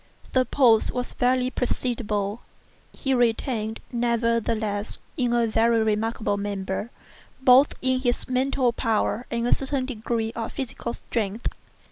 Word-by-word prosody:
The 255 -1 +4
pulse 235 -5 +4
was 250 0 -3
barely 250 0 +2
perceptible. 225 -4 -2 0.5
He 270 -2 -1
retained, 230 -2 0
nevertheless, 230 -3 0 0.2
in 245 -5 0
a 240 -1 +3
very 225 0 +3
remarkable 215 -1 0
manner, 200 +1 -3 0.5
both 260 +2 +6
his 255 -1 +1
mental 255 -1 +1
power 225 +1 0
and 235 0 -1
a 245 - +2
certain 270 -1 0
degree 225 -2 -2
of 230 -1 -5
physical 240 -2 -4
strength. 220 0 -2
235 Hz, 120 wpm, -25 LUFS, 220-255 Hz, 0.5 s, both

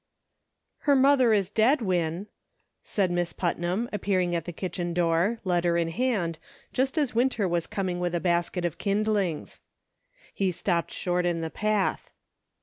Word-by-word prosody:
HER 285 - +7
mother 265 -3 +5
is 200 -3 +2
dead, 235 +8 +4
Win," 175 -1 -1 0.6
said 190 -4 0
Miss 175 -1 -1
Putnam, 175 +5 -1
appearing 185 -4 0
at 165 -2 -2
the 175 - -4
kitchen 175 0 -4
door, 175 +6 +2
letter 175 -2 +1
in 165 -1 0
hand, 185 -6 -1 0.3
just 265 +4 0
as 290 -5 +1
Winter 235 -4 +1
was 170 -1 -1
coming 185 -3 -2
with 175 -1 -1
a - - +1
basket 175 0 0
of 170 - -3
kindlings. 200 -5 -1 0.7
He 195 -2 0
stopped 170 -1 -1
short 180 0 -1
in 170 -1 -1
the 160 -1 -4
path. 210 -2 0
180 Hz, 150 wpm, -27 LUFS, 175-215 Hz, 0.7 s, HER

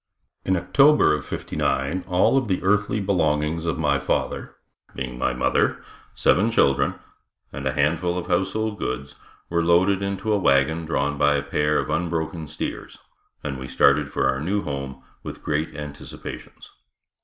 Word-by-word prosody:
In 95 0 +1
October 140 - +4
of 75 - -2
'59 75 +8 -2
all 90 +8 +3
of 135 -3 +2
the 95 -3 -1
earthly 105 +2 +2
belongings 80 -4 0
of 80 - -1
my 75 -3 +1
father, - - -2 0.4
being - - -4
my - - +1
mother, 60 - +1 0.3
seven 105 +5 +3
children 70 - +2 0.6
and - - -4
a - - 0
handful 80 +4 +1
of 90 - -3
household 105 +4 -1
goods, 70 +3 -4 0.4
were 85 -1 +2
loaded 90 +4 +3
into 100 +2 -1
a 105 - +2
wagon 80 +1 +2
drawn 70 -2 -1
by 75 0 +4
a 70 - -1
pair 75 +1 +1
of - - -1
unbroken 80 -2 -2
steers, - - -6 0.5
and 70 -2 -4
we 65 - -6
started 70 +2 +3
for - - +1
our 65 0 0
new 100 +6 -1
home 70 -3 -5 0.2
with - - -8
great 75 +1 -2
anticipations. 75 -1 -9
80 Hz, 155 wpm, -23 LUFS, 70-95 Hz, 0.6 s, October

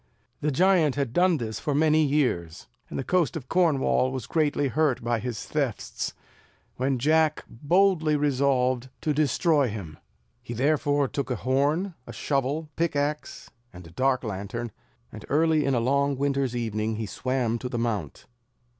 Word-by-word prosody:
The 150 - 0
giant 165 -1 +3
had 140 -5 -2
done 180 -1 +3
this 110 -4 -4
for 145 -3 -1
many 155 +1 +4
years, 125 - 0 0.2
and - - -5
the - - -2
coast 175 +1 +1
of 135 -5 -9
Cornwall 145 -6 +2
was 130 -4 -4
greatly 150 -3 +1
hurt 150 -3 +1
by 120 -1 0
his 115 -2 -5
thefts, - - -3 0.6
when 130 +1 0
Jack 155 +4 +2
boldly 160 +3 +2
resolved 130 -3 +1
to 155 - 0
destroy 150 0 +2
him. 100 -9 -7 0.4
He 120 -1 -7
therefore 145 +2 +2
took 140 0 -4
a 125 - 0
horn, 145 - 0
a - - -8
shovel, 140 +3 -1
pickaxe, 150 -2 -2 0.2
and 90 -1 -12
a 85 - -13
dark 130 +7 +1
lantern, 110 +2 -4 0.4
and - - -10
early 155 0 +3
in 135 -1 +1
a - - +2
long 140 +3 +1
winter's 135 -2 0
evening 110 -2 -2
he 110 0 -3
swam 120 +1 -1
to 125 - -5
the 120 - -3
mount. 115 -3 -3
140 Hz, 160 wpm, -26 LUFS, 120-150 Hz, 0.6 s, many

